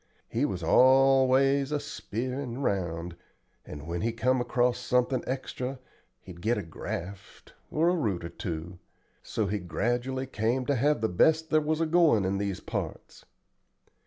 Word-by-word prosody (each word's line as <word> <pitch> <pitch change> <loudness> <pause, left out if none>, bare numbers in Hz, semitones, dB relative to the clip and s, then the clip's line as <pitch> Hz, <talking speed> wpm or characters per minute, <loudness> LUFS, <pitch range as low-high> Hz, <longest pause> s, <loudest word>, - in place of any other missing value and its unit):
He 120 +5 0
was 90 - -3
always 135 - +4
a 150 - 0
speerin' 125 +1 -4
round, 85 -5 -2 0.5
and 75 0 -9
when 85 +1 -3
he 115 - 0
come 125 +3 +1
across 120 0 +1
something 125 0 +1
extra 130 0 -4 0.4
he'd 85 -2 -12
get 115 +5 +1
a - - -3
graft, 90 +4 -7 0.2
or 160 +2 +1
a 180 - +2
root 105 - -1
or - - -5
two. 85 -2 -6 0.4
So 110 - -2
he 100 +2 -1
gradually 120 +10 -2
came 125 +1 -1
to 145 - +1
have 140 0 +2
the 110 - +2
best 160 - +2
there 155 -1 +4
was 155 +1 -1
a - - +3
goin' 160 - +4
in 95 +1 0
these 100 -2 -2
parts. - - -6
120 Hz, 160 wpm, -28 LUFS, 95-135 Hz, 0.5 s, always